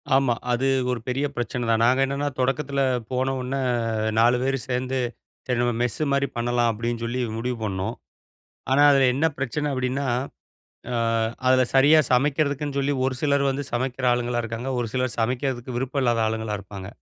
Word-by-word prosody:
ஆமா. 135 -3 +3 0.2
அது 125 +2 +1 0.2
ஒரு 125 - -2
பெரிய 130 +3 0
பிரச்சனை 120 0 -3
தான். 115 0 +3
நாங்க 130 +2 +3
என்னான்னா, 140 +2 -2
தொடக்கத்தில 135 +2 0 0.3
போனவுன்ன 130 0 -1 0.5
அ - - 0
4 120 +2 +5
பேரு 135 +1 +1
சேந்து, 130 +1 -1 0.5
சரி 125 -2 -1
நம்ம 120 0 +1
மெஸ்ஸு 125 +5 -1
மாரி 140 0 +2
பண்ணலாம் 120 0 +1
அப்பிடின் 115 +1 -3
சொல்லி 120 +2 -2 0.2
முடிவு 125 +1 -2
பண்ணோம். 95 -2 -2 0.8
ஆனா, 135 +2 +4
அதில 135 -2 +4
என்ன 150 +4 +1
பிரச்சனை 140 +3 -2
அப்பிடின்னா, 130 +1 -1 0.9
அ - - -1 0.5
அதில 130 0 +5
சரியா 145 +4 +6
சமைக்கிறதுக்குன்னு 140 +1 +1
சொல்லி, 140 +1 0
ஒரு 130 - -1
சிலர் 140 -1 +2
வந்து 140 +2 -3
சமைக்கிற 130 +1 -2
ஆளுங்களா 120 0 -1
இருக்காங்க. 115 +3 -4
ஒரு 120 - -1
சிலர் 130 -1 -1
சமைக்கிறதுக்கு 125 +1 -2
விருப்பம் 135 +2 -1
இல்லாத 120 -2 +2
ஆளுங்களா 110 -1 -2
இருப்பாங்க. 100 -1 -9
130 Hz, 160 wpm, -24 LUFS, 120-135 Hz, 0.9 s, சரியா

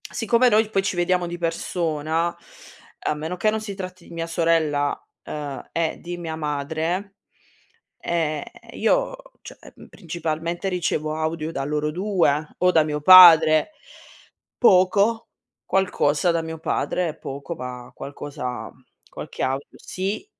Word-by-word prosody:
Siccome 235 +2 +2
noi 215 -1 +3
poi 195 -3 +1
ci 195 - -1
vediamo 175 0 +1
di 175 0 -5
persona, 165 -1 -1 0.7
a - - 0
meno 160 +4 -5
che 215 +5 +2
non 220 0 -1
si 205 -2 -6
tratti 185 -2 -8
di - - -12
mia 165 0 -4
sorella, 165 -4 +1 0.2
ehm, 145 -2 -6
e 165 -1 -1
di 175 0 -6
mia 165 -2 -5
madre, 160 +6 -3 0.8
ehm, 155 -3 -1 0.3
io, - - +1 0.3
cioè, - - -12 0.3
principalmente 170 +2 -4
ricevo 160 -4 -1
audio 160 0 -3
da 135 - -3
loro 150 +1 -1
2 170 -5 +1
o 180 - +4
da 160 - +5
mio 150 -1 -3
padre, 165 - +8 0.9
poco, 200 +2 +3 0.4
qualcosa 175 -4 +1
da 165 0 0
mio 160 0 -7
padre, 165 0 -2
poco, 140 +4 -7
ma 125 -2 -8
qualcosa 135 -3 -6 0.4
qualche - - -8
audio 135 +2 -2
sì. 195 - -4
165 Hz, 130 wpm, -23 LUFS, 150-185 Hz, 0.9 s, padre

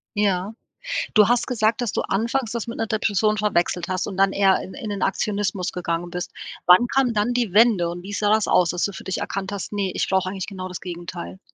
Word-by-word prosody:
Ja, 200 0 0 0.6
du 210 -2 +7
hast 240 0 +2
gesagt, 225 -2 +1
dass 240 -4 -1
du - - 0
anfangs 230 +4 -1
das 235 -2 -3
mit 230 - -5
'ner 225 - 0
Depression 215 -1 +1
verwechselt 180 -4 0
hast 185 -1 -1
und 195 - -6
dann 195 0 +3
eher 195 -1 +3
in 190 - -9
in 260 -6 -6
den 200 -2 -4
Aktionismus 200 -2 -1
gegangen 175 0 -3
bist, 180 0 -4 0.4
wann 180 +7 +7
kam 260 -1 +2
dann 215 +3 +1
die 240 -6 0
Wende 210 -5 +5
und 175 +1 -6
wie 205 - -7
sah 205 0 +1
das 215 -1 +3
aus, 175 -2 +3
dass 175 0 -1
du 200 - -1
für - - -9
dich 190 - -2
erkannt 195 0 -3
hast: 200 0 -5
„Ne, 200 -2 -1
ich - - -1
brauche 190 -1 +1
eigentlich 190 -1 -4
genau 185 -2 -6
das 180 - -7
Gegenteil.“? 175 +1 -7
200 Hz, 235 wpm, -23 LUFS, 185-215 Hz, 0.6 s, du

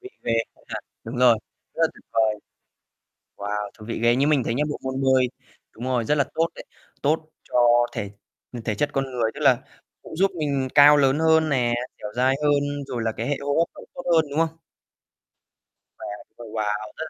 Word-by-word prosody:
vị 385 - -8 0.2
ghê. - - 0 0.2
Công - - -26
nhận, - - -5 0.2
đúng 115 +3 -6
rồi, 120 -3 +6 0.4
rất - - -1
tuyệt - - -19
vời. 110 -1 +3 1.0
Wow, 105 0 -3
thú 105 - -10
vị 115 - -3
ghê. 120 0 +4
Như 135 +3 +2
mình 150 -4 +3
thấy 115 - -1
nhá, 140 +5 +1
bộ 145 - -3
môn 130 0 -3
bơi 130 -1 +4 0.5
đúng 115 - -9
rồi, 125 -2 0
rất 150 - +2
là 140 - +3
tốt 165 +1 +2
đấy. - - -9 0.4
Tốt 155 +2 0
cho 120 0 +4
thể 100 -1 -4 0.5
thể 105 - -1
chất 145 +8 0
con 135 0 0
người. 115 -3 0
Tức - - -9
là - - +5 0.4
cũng - - -10
giúp 195 +4 +2
mình 140 -4 0
cao 145 +1 +9
lớn 135 0 +3
hơn 160 -1 +4
nè, 125 -4 +2 0.3
dẻo 105 - -6
dai 130 +2 +3
hơn, 145 -1 +1
rồi 125 -4 -3
là 115 - 0
cái 115 +2 -4
hệ 145 -1 0
hô 140 0 -1
hấp 170 - +3
nó - - -12
cũng - - -16
tốt 175 - -7
hơn, 160 -1 +4
đúng 145 - 0
không? 165 0 0 1.4
Đấy, - - -7 0.3
ồ 120 - -10
wow, 105 -1 -3
rất 160 - -4
130 Hz, 215 wpm, -24 LUFS, 115-145 Hz, 1.4 s, cao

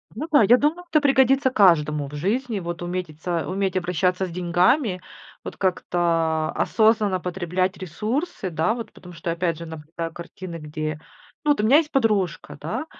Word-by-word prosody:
Ну 305 +8 -4
да, 290 - +6
я 235 +5 +6
думаю, 325 +6 0
это 305 -1 +3
пригодится 270 -1 +4
каждому 150 - +3
в 145 - -12
жизни. 215 - -1
Вот 170 0 -5
уметитса 175 -1 -3
уметь 190 0 -1
обращаться 180 +1 0
с - - -7
деньгами, 180 - +1 0.4
вот - - -8
как-то, 185 -2 -1
а, 160 -2 +1
осознанно 215 -4 +2
потреблять 180 +1 -2
ресурсы, 210 - -3
да, 160 +6 0
вот, 230 -2 -7
потому 180 -1 -13
что, 165 +1 -3
опять 170 -1 -1
же, 170 - -7
наблюдаю 160 +1 -7
картины, 175 0 -8
где 155 0 -5 0.4
ну, 300 - +3
вот 290 - +2
у - - -3
меня 270 +7 +6
есть 310 -1 +1
подружка, 215 -8 0
да, 315 - -3
185 Hz, 170 wpm, -23 LUFS, 165-225 Hz, 0.4 s, да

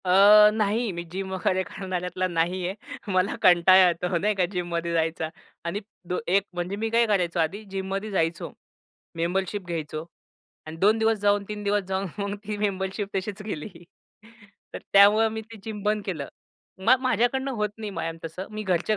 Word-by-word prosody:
अ, 205 +3 +8
नाही 220 +1 0
मी 170 -1 -5
जिम 190 0 -4
वगैरे 185 0 0
करणाऱ्यातला 185 -1 -3
नाही 175 +1 -1
आहे 200 +1 -8
मला 185 +2 +1
कंटाळा 185 +1 +7
येतो 175 +1 0
नाही 210 +4 +1
का 185 -2 +2
जिममध्ये 170 -2 -2
जायचा. 160 -1 0 0.4
आणि 170 +4 -2 0.3
दो 180 - 0
एक 195 +2 +3
म्हणजे 175 +2 -3
मी 225 +2 -2
काय 235 +1 +3
करायचो 180 -5 +1
आधी 165 +7 -1
जिममध्ये 195 +2 -3
जायचो 165 -3 -1 0.7
मेंबरशिप 190 +4 -1
घ्यायचो 155 -2 -4 0.6
अन् 155 +1 -7
2 215 +3 +4
दिवस 220 0 +2
जाऊन 205 0 +2
3 210 -1 -5
दिवस 205 0 +1
जाऊन 190 +1 -1
मग 200 0 -2
ती 210 0 -3
मेंबरशिप 195 0 -2
तशीच 195 +2 -4
गेली. 200 -7 -5 1.1
तर - - -3
त्यामुळं 205 +3 +7
मी 220 - -4
ते 225 +1 -13
जिम 215 -2 -6
बंद 210 0 0
केलं. 155 -8 -4 0.5
मग 230 +7 +4
माझ्याकडनं 255 +2 +1
होत 210 -1 0
नाही 215 -2 -5
मॅम 165 -3 -4
तसं. 165 +4 -6
मी 215 0 -5
घरच्या 190 +2 +1
195 Hz, 170 wpm, -25 LUFS, 175-210 Hz, 1.1 s, अ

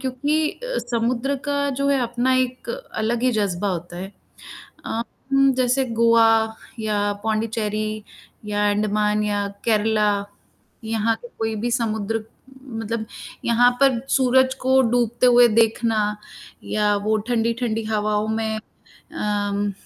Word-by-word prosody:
क्योंकि 285 +4 0
अ, - - -5
समुद्र 245 +4 0
का 285 0 0
जो 280 - +2
है 275 -2 +2
अपना 245 +2 +1
एक 255 - -10 0.3
अलग 235 +2 0
ही 255 0 +3
जज़्बा 200 -3 -1
होता 175 -1 -4
है 190 +3 -7 0.7
अ, 230 - -2 0.6
जैसे 255 +1 +2
गोवा 230 -1 +6 0.5
या 205 -2 0
पोंडिचेरी 215 -1 -2 0.4
या 205 0 +1
अंडमान 210 0 +1
या 205 -1 -1 0.2
केरला 215 -1 +2 0.7
यहाँ 225 0 0
के 240 - -9
कोई 225 0 -1
भी 240 - 0
समुद्र 225 -1 -1 0.4
मतलब 225 -2 -4 0.4
यहाँ 240 +1 +4
पर 265 -4 +4
सूरज 260 0 +3
को 260 +1 +4
डूबते 240 0 +1
हुए 245 0 +7
देखना, 225 +1 +2 0.7
या 210 -1 +1
वो 215 +1 +2
ठंडी-ठंडी 230 -1 0
हवाओं 215 -1 0
में 220 0 -1
अम 205 -1 -4
225 Hz, 125 wpm, -22 LUFS, 210-245 Hz, 0.7 s, हुए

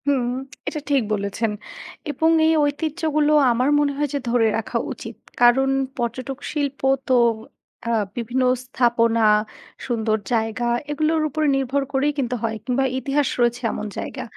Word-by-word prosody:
হুম, 265 -4 +2 0.4
এটা 305 - -2
ঠিক 280 -2 +3
বলেছেন 205 +2 -1 0.6
এবং 320 +2 +1 0.2
এই 320 - +4
ঐতিহ্যগুলো 305 +1 0 0.2
আমার 250 +4 +1
মনে 290 -1 +2
হয় 295 0 +1
যে, 285 - 0
ধরে 235 -1 +3
রাখা 225 - -2
উচিত। - - -8 0.3
কারণ 255 +3 +5 0.3
পর্যটক 255 +2 -3
শিল্প 285 -2 -2 0.3
তো 260 - +2 0.7
অ্যা 235 0 +1 0.2
বিভিন্ন 245 +2 -1 0.2
স্থাপনা, 230 -3 +2 0.6
সুন্দর 220 -3 0 0.2
জায়গা 225 +1 0 0.2
এগুলোর 310 +2 +1
উপরে 310 +1 0
নির্ভর 270 +1 0
করেই 285 +2 +1
কিন্তু 250 -2 -1
হয় 220 -1 -1
কিংবা 255 +2 +1 0.2
ইতিহাস 275 +2 0
রয়েছে 240 0 +2
এমন - - -4
জায়গা। - - -5
260 Hz, 140 wpm, -22 LUFS, 235-290 Hz, 0.7 s, কারণ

